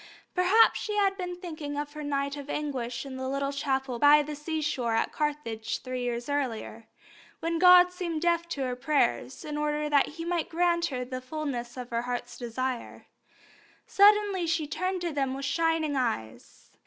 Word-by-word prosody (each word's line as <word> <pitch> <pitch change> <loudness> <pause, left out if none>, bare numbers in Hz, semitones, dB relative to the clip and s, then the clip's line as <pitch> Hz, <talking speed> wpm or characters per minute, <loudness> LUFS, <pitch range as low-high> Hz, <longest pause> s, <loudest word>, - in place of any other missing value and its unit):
Perhaps 375 +5 +5
she 425 - -3
had 395 -1 +2
been 360 -2 -4
thinking 310 -5 -6
of 290 0 -4
her 305 - -7
night 280 -1 -1
of 285 0 -8
anguish 255 -5 -3
in 265 -1 -7
the 260 0 -3
little 275 +1 -1
chapel 270 -3 -1
by 295 +2 +7
the 300 +1 -6
seashore 295 -6 -1
at 225 - 0
Carthage 290 -8 -2
three 255 -1 -4
years 240 -1 -2
before, 240 -5 -3 0.5
when 330 0 -1
God 360 0 +9
had 360 - -10
seemed 340 -3 -3
deaf 340 0 +1
to 285 - -3
her 250 -1 -2
prayers, 245 - 0
in 300 -1 -4
order 300 0 -1
that 285 -2 +4
He 330 +2 -7
might 345 -2 -1
grant 340 0 +2
her 250 -4 -4
the 255 0 -5
fulness 255 -3 -5
of 250 -1 -7
her 235 0 0
heart's 245 0 -4
desire. 245 +1 -4 0.8
Suddenly 405 -3 +4
she 320 -1 0
turned 365 +5 -2
to 345 -1 -2
them 270 -2 -1
with 275 0 -4
shining 325 -2 +1
eyes. 225 - -4
290 Hz, 180 wpm, -28 LUFS, 255-335 Hz, 0.8 s, God